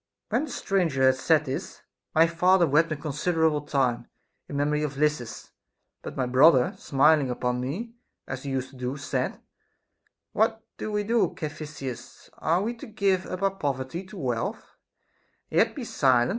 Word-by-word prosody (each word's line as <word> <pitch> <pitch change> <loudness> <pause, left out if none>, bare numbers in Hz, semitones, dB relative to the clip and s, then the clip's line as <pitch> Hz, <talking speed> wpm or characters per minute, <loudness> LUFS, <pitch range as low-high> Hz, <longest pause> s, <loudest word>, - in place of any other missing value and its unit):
14. - - +2
When - - -2
the - - -8
stranger 175 - 0
had 130 0 +5
said 155 +3 +3
this, 130 - -5 0.3
my 160 +1 +7
father 175 +2 +4
wept 155 +2 +3
a - - 0
considerable 155 +1 0
time, 135 -5 0 0.4
in 140 - -4
memory 150 +1 +1
of 145 -2 -3
Lysis; 150 -6 -1 0.5
but - - -8
my 130 - +1
brother, 130 +1 +5
smiling 145 0 +3
upon 125 0 -1
me, 190 - -4 0.3
as 130 -1 -5
he 140 - -5
used 130 -1 -2
to 135 - -14
do, 125 +2 -3
said: 145 - -2 0.9
What 220 +1 +1 0.2
do 215 - -3
we 210 0 0
do, 230 +2 +1
Caphisias 150 -5 -7
\ - - -25
Are 170 +5 +1
we 230 +3 -1
to - - -9
give 200 -4 0
up 185 - -5
our 195 - +3
poverty 145 -2 -3
to 200 - -11
wealth, 125 -8 -3 0.8
and - - +3
yet - - +3
be - - -5
silent? 125 -3 +3
150 Hz, 175 wpm, -26 LUFS, 130-180 Hz, 0.9 s, my